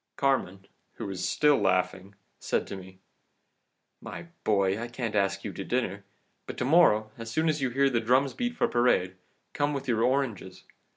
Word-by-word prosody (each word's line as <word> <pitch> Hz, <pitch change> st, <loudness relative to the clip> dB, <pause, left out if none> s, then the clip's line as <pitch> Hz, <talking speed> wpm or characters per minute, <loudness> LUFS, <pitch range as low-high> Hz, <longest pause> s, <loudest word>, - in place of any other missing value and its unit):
Carmen, 100 Hz, -9 st, 0 dB, 0.3 s
who -, -, -7 dB
was 95 Hz, -1 st, -3 dB
still 150 Hz, -2 st, +4 dB
laughing, 95 Hz, 0 st, 0 dB, 0.2 s
said -, -, -1 dB
to -, -, -7 dB
me: 95 Hz, 0 st, -11 dB, 1.0 s
"'My 170 Hz, -, -8 dB
boy, 100 Hz, 0 st, +1 dB
I 120 Hz, -, -4 dB
can't 120 Hz, -2 st, -4 dB
ask 100 Hz, -1 st, 0 dB
you 105 Hz, -, -5 dB
to 95 Hz, -, -5 dB
dinner. 100 Hz, -4 st, -2 dB, 0.4 s
But -, -, -7 dB
to -, -, -1 dB
morrow, 110 Hz, -8 st, +4 dB
as 115 Hz, 0 st, -6 dB
soon 160 Hz, +7 st, 0 dB
as 155 Hz, -2 st, 0 dB
you 130 Hz, -, +1 dB
hear 135 Hz, +3 st, +2 dB
the 125 Hz, -4 st, +1 dB
drums 130 Hz, +4 st, +2 dB
beat 245 Hz, 0 st, -3 dB
for 240 Hz, -, +2 dB
parade, 120 Hz, -, +2 dB, 0.4 s
come 145 Hz, 0 st, 0 dB
here 145 Hz, -, -2 dB
with 135 Hz, 0 st, -5 dB
your 115 Hz, -3 st, +1 dB
oranges. 120 Hz, -7 st, -1 dB
115 Hz, 185 wpm, -28 LUFS, 100-135 Hz, 1.0 s, still